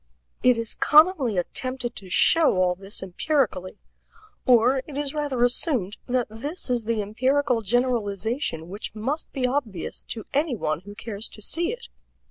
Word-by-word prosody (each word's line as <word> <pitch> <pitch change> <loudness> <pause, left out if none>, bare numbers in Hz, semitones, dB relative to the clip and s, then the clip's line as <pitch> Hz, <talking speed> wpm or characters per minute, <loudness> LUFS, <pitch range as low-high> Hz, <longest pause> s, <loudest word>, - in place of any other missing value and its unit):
It 250 -2 +5
is 230 -1 -1
commonly 300 - +5
attempted 255 +7 -2
to 190 -3 -9
show 325 - +4
all 180 -1 +3
this 195 +3 -5
empirically 190 - -1 0.7
or 250 +2 +5
it 285 -2 -7
is 290 -1 -1
rather 290 -5 0
assumed 245 - +1
that 250 -1 +1
this 275 +7 -5
is 240 -3 0
the 225 -2 0
empirical 255 +3 +1
generalization 220 - -1
which 200 +4 -7
must 265 +9 -3
be 265 -3 -1
obvious 250 - -2
to 220 - -6
any 290 -1 +1
one 155 -7 -1
who 205 +3 -11
cares 215 0 -5
to 215 - -11
see 340 - -1
it. 475 0 -8
240 Hz, 155 wpm, -25 LUFS, 205-280 Hz, 0.7 s, It